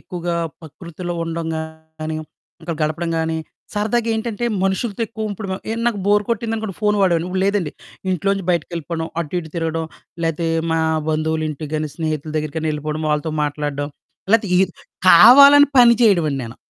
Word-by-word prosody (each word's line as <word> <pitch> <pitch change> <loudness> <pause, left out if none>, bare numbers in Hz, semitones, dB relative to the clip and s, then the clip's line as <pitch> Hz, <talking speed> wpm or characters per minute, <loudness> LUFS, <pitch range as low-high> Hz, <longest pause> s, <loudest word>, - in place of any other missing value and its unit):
ఎక్కువగా 175 -1 -4 0.3
పకృతిలో 170 +3 -7
ఉండడం 165 0 -4
గానీ, 160 0 -7 0.5
ఇంకా 165 0 -3
గడపడం 165 +2 -1
గానీ, 160 0 -1 0.4
సరదాగేంటంటే, 225 +1 -1 0.2
మనుషులతో 200 +3 -1
ఎక్కువ 220 -2 -4
ఉప్పుడు 200 0 -7
మ - - -1 0.2
ఏ - - 0
నాకు 230 -4 +1
బోరు 205 0 +3
కొట్టిందనుకోండి 225 -3 -2
ఫోను 210 -1 +2
వాడేవోడిని, 175 -2 +2
ఇప్పుడు 190 +1 0
లేదండి. 200 -7 0 0.4
ఇంట్లోంచి 195 +2 -1
బయటికెళ్ళిపోడం, 170 -1 -2
అటు 170 +2 -4
ఇటు 160 - -11
తిరగడం, 165 0 -2 0.4
లేతే 165 +1 -1 0.2
మా 165 - +1 0.3
బంధువులింటికి 155 -1 -2
గానీ, 155 -1 -2
స్నేహితుల 155 -2 -3
దెగ్గిరకన్నా 155 +1 -2
యెళ్ళిపోడం, 150 +1 -4
వాళ్ళతో 150 +1 -1
మాట్లాడడం, 145 -1 -3 0.4
లేతే 215 -3 +3
ఈర్ 190 -1 +2 0.4
కావాలని 280 +9 +9
పని 240 -1 +8
చెయడవండి 170 -10 +3
నేను. 115 +2 -9
170 Hz, 145 wpm, -20 LUFS, 155-205 Hz, 0.5 s, కావాలని